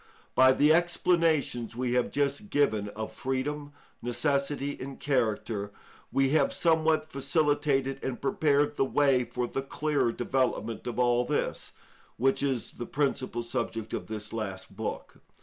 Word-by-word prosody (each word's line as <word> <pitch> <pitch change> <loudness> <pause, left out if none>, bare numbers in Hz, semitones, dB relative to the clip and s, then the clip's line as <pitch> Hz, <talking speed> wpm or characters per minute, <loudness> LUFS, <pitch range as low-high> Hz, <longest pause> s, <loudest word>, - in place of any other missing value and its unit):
By 130 0 +7
the 150 +4 +5
explanations 165 -8 +1
we 125 0 -1
have 125 -1 +2
just 140 +8 -1
given 110 - +1
of 110 0 -4
freedom, 145 +3 -3 0.3
necessity, 140 +3 -1
and 135 +1 -7
character, 110 -6 -1 0.4
we 135 0 +3
have 155 +3 +3
somewhat 160 -1 +2
facilitated 140 -2 +1
and 130 -2 -3
prepared 145 +1 +1
the - - +3
way 135 -2 +3
for 120 +1 -2
the 135 - -3
clearer 145 -2 0
development 120 -2 -1
of 120 -2 -4
all 120 -1 +3
this, 150 +4 -2 0.4
which 135 +2 +2
is 135 -4 -1
the 120 - -7
principal 130 -4 -1
subject 115 -2 -3
of - - -3
this 105 -1 -6
last 95 -4 -5
book. 110 +1 -5
135 Hz, 140 wpm, -29 LUFS, 120-145 Hz, 0.4 s, By